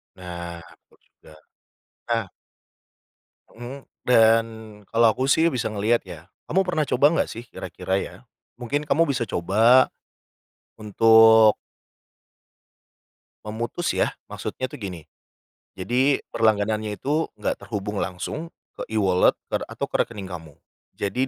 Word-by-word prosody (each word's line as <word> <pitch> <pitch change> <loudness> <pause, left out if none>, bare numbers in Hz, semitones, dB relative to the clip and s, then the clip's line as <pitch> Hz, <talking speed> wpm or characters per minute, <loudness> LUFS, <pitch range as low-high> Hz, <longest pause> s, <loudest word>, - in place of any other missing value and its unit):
Nah, 85 -2 -7
betul - - -21
juga. - - -21 0.8
Nah 115 -2 +1 1.3
Mmm, 125 +4 -9 0.2
dan 115 -2 +5 0.5
kalau 115 0 +5
aku 130 - -2
sih 165 +1 +4
bisa 125 -8 -2
ngeliat 110 +3 +1
ya. 85 -3 -11 0.2
Kamu 190 +4 +2
pernah 170 -4 +1
coba 130 +3 +2
nggak - - 0
sih? 115 +1 -8
Kira-kira 95 - -4
ya - - -6 0.4
mungkin 130 +4 -2
kamu 165 +4 +4
bisa 140 -4 -2
coba, 110 +9 +4 0.9
untuk 110 0 +6 1.9
memutus 115 +11 -3
ya, - - 0
maksudnya 130 - -5
tuh 145 +3 -8
gini. 90 -4 -6 0.8
Jadi 125 +9 +2 0.2
berlangganannya 110 -1 +1
itu 150 +4 -1
nggak - - -2
terhubung 105 -2 -4
langsung 95 - -5 0.3
ke - - -4
E-wallet 95 -4 +3 0.2
ter - - 0
atau - - -4
ke - - -7
rekening 105 -4 -9
kamu. 80 -4 -9 0.4
Jadi 115 +7 -1
110 Hz, 120 wpm, -24 LUFS, 100-130 Hz, 1.9 s, untuk